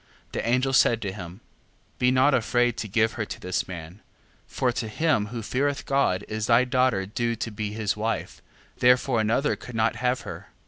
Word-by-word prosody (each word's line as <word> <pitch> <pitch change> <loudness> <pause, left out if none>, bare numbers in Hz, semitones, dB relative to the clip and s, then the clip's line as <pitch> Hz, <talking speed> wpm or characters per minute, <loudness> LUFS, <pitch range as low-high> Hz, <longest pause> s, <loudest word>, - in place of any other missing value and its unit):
The - - -3
angel 125 +3 +1
said 115 -3 +4
to 100 - -2
him: 95 +1 -9 0.6
Be 125 - +4
not 130 +3 +4
afraid 120 0 +2
to 110 - -3
give 110 +2 +2
her 110 -2 -3
to - - -7
this 90 0 -2
man, 85 +1 -9 0.5
for 125 - 0
to 120 -1 -3
him 110 -2 +1
who 115 +1 -6
feareth 140 +5 -1
God 135 -9 +1
is 110 0 -3
thy 120 +1 +5
daughter 125 -6 +1
due 115 +4 -2
to 115 +1 -4
be 105 0 -4
his 110 -2 -1
wife: 110 +2 -3 0.4
therefore 125 -1 +4
another 115 +7 +1
could 125 - -10
not 110 0 +1
have 125 +1 0
her. - - -8
115 Hz, 190 wpm, -25 LUFS, 105-125 Hz, 0.6 s, thy